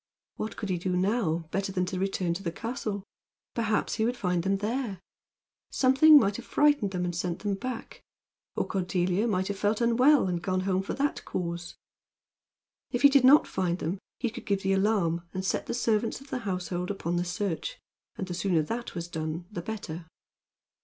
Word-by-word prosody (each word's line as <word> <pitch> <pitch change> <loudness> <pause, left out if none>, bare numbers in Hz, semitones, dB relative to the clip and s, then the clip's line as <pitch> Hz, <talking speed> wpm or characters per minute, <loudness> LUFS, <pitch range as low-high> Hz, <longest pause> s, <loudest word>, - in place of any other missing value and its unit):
What 215 - -4
could 205 - -4
he 180 -2 0
now 195 +6 +1
do 165 -1 -5
better 195 +1 -1
than 185 -1 0
to 185 0 -3
return 190 -2 0
to 175 - -5
the 170 -4 -2
castle? 215 -1 -4 0.5
Perhaps 220 -2 0
he 220 - 0
would 245 +2 0
find 180 -4 0
them 195 +2 +1
there. 215 -1 -2 0.7
Something 270 +4 +7
might 200 -5 +1
have 245 - -8
frightened 290 -8 +3
them 180 -2 -2
and 175 -1 -3
sent 175 -1 -2
them 205 -1 -2
back; 235 +5 -6 0.5
or - - 0
Cordelia 185 +2 0
might 190 -3 0
have 200 -1 -3
felt 210 +1 +1
unwell 250 +2 +4
and 175 -2 -1
gone 185 0 0
home 190 0 +1
for 195 - -4
that 285 +1 -1
cause. 170 -1 -4 1.1
If 245 - -2
he 280 - +10
did 280 -2 +5
not 275 +4 +8
find 175 -2 -1
them 185 +2 -3 0.2
he 240 - -1
could 240 - -9
give 200 -1 0
the 195 0 +2
alarm 195 -4 +2
and 190 0 -2
set - - -1
the - - -2
servants 230 -1 +1
of 275 +1 -16
the 255 - -1
household 180 -4 -3
upon 175 -4 -2
the 175 - +1
search. 180 - -3 0.4
And 190 - -4
the 180 - -4
sooner 175 -2 +1
that 230 +8 -5
was 170 -1 -4
done 160 0 -4
the 175 - -4
better. 175 -5 -6
195 Hz, 195 wpm, -28 LUFS, 180-230 Hz, 1.1 s, he